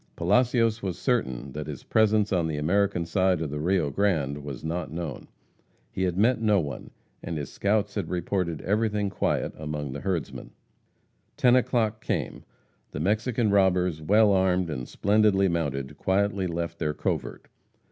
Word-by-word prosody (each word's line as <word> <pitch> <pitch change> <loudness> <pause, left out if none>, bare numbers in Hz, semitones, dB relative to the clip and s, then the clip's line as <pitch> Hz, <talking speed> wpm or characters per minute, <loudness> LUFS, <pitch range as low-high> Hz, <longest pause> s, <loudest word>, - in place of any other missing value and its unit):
Palacios 115 +4 +2
was 95 -3 -3
certain 70 - -1
that 75 +2 -6
his 75 -3 -7
presence 110 -2 +2
on 85 -3 +1
the 80 -2 -3
American 90 +3 +1
side 95 0 +1
of 80 -3 -3
the 75 - -3
Rio 85 -2 +1
Grande 75 -6 0
was 70 -2 -7
not 80 0 -3
known. 80 -5 -5 0.6
He - - -4
had 90 -1 -2
met 115 +3 +3
no 105 -3 +3
one, 70 -6 -5 0.3
and 85 - -4
his 70 -3 -5
scouts 105 0 0
had - - -3
reported 90 -2 -2
everything 105 0 0
quiet - - -1
among 75 -2 -5
the 70 - -5
herdsmen. 95 -5 -4 0.8
Ten 125 -1 +5
o'clock 115 -4 +1
came. - - -3 0.5
The - - -6
Mexican 110 - +1
robbers, 90 -4 +2
well 105 +6 +4
armed 95 -3 +2
and 65 -4 -5
splendidly 100 -1 +3
mounted, 70 -5 -2
quietly 95 0 +1
left 85 0 -4
their 75 0 -1
covert. 80 -10 -3
90 Hz, 155 wpm, -26 LUFS, 75-105 Hz, 0.8 s, Ten